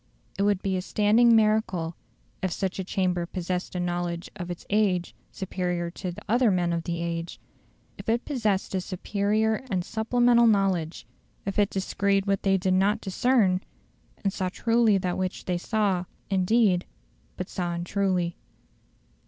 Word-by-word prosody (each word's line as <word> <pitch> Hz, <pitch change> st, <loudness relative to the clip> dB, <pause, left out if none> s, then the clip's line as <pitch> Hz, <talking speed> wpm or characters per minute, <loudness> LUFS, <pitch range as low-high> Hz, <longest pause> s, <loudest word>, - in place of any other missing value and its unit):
It -, -, -3 dB
would 200 Hz, -1 st, +2 dB
be 190 Hz, -1 st, 0 dB
a -, -, -1 dB
standing 220 Hz, +5 st, +4 dB
miracle 215 Hz, -7 st, +2 dB, 0.5 s
if 185 Hz, -, -1 dB
such 190 Hz, +2 st, -2 dB
a -, -, -1 dB
chamber 180 Hz, -2 st, -1 dB
possessed 180 Hz, 0 st, -3 dB
a -, -, -1 dB
knowledge 175 Hz, -1 st, -2 dB
of 180 Hz, -3 st, -6 dB
its 175 Hz, -, -6 dB
age 195 Hz, -4 st, +1 dB, 0.2 s
superior 180 Hz, -3 st, -3 dB
to 185 Hz, +1 st, -5 dB
the 175 Hz, -, -10 dB
other 240 Hz, +2 st, +3 dB
men 175 Hz, -3 st, +1 dB
of 165 Hz, -1 st, -2 dB
the 170 Hz, -1 st, -2 dB
age; 170 Hz, 0 st, -4 dB, 0.6 s
if -, -, -5 dB
it 230 Hz, +2 st, +1 dB
possessed 215 Hz, -11 st, -1 dB
a 190 Hz, -, 0 dB
superior 210 Hz, +4 st, 0 dB
and 185 Hz, -4 st, -1 dB
supplemental 235 Hz, +1 st, +3 dB
knowledge; 190 Hz, -6 st, +1 dB, 0.4 s
if 195 Hz, +1 st, -2 dB
it 205 Hz, -1 st, +3 dB
descried 195 Hz, 0 st, 0 dB
what 195 Hz, -1 st, +1 dB
they 195 Hz, -1 st, +3 dB
did 185 Hz, 0 st, +1 dB
not 200 Hz, +4 st, +3 dB
discern, 195 Hz, -2 st, +2 dB, 0.6 s
and 195 Hz, -2 st, 0 dB
saw 185 Hz, -1 st, -1 dB
truly 230 Hz, +1 st, +3 dB
that 180 Hz, -1 st, -2 dB
which 185 Hz, 0 st, -3 dB
they 180 Hz, -1 st, -1 dB
saw, 195 Hz, -3 st, 0 dB, 0.3 s
indeed, 190 Hz, -1 st, +3 dB, 0.5 s
but 185 Hz, -, -4 dB
saw 175 Hz, -2 st, -3 dB
untruly. 175 Hz, 0 st, -1 dB
190 Hz, 160 wpm, -26 LUFS, 180-210 Hz, 0.6 s, standing